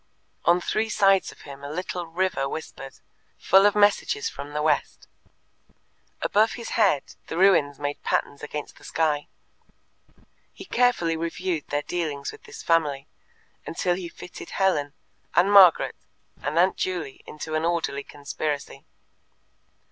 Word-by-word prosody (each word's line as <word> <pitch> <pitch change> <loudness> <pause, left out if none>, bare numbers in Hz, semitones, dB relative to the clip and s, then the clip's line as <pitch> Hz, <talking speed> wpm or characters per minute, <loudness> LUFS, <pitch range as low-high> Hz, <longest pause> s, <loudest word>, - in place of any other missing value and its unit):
On 175 +1 +5
three 215 +5 -1
sides 195 -2 +3
of - - -17
him 140 -1 -11
a 140 - -6
little 180 +2 -4
river 165 -5 -1
whispered, 135 -3 -7 0.4
full 195 +2 +5
of 205 - +1
messages 210 - +2
from 145 - -8
the 150 0 -2
west; 150 -2 0 1.2
above 220 +2 +3
his 235 -2 -7
head 195 -11 +3 0.2
the 160 - -5
ruins 160 -7 +4
made 145 0 -4
patterns 140 - -1
against 150 0 -6
the - - -19
sky. 150 -3 0 1.2
He 380 - -11
carefully 245 - +2
reviewed 170 0 -3
their 145 0 -1
dealings 150 -5 -3
with - - -15
this - - -10
family, 150 -5 +1 0.6
until 175 +2 0
he 175 -1 -5
fitted 175 0 -10
Helen, 150 -7 +1 0.4
and 190 +4 +4
Margaret, 190 -4 +7 0.5
and 145 +3 -2
Aunt 185 +2 +4
Juley 170 -7 -3
into 155 +1 -7
an 155 0 0
orderly 165 -4 0
conspiracy. 145 -1 -5
165 Hz, 140 wpm, -25 LUFS, 145-190 Hz, 1.2 s, Margaret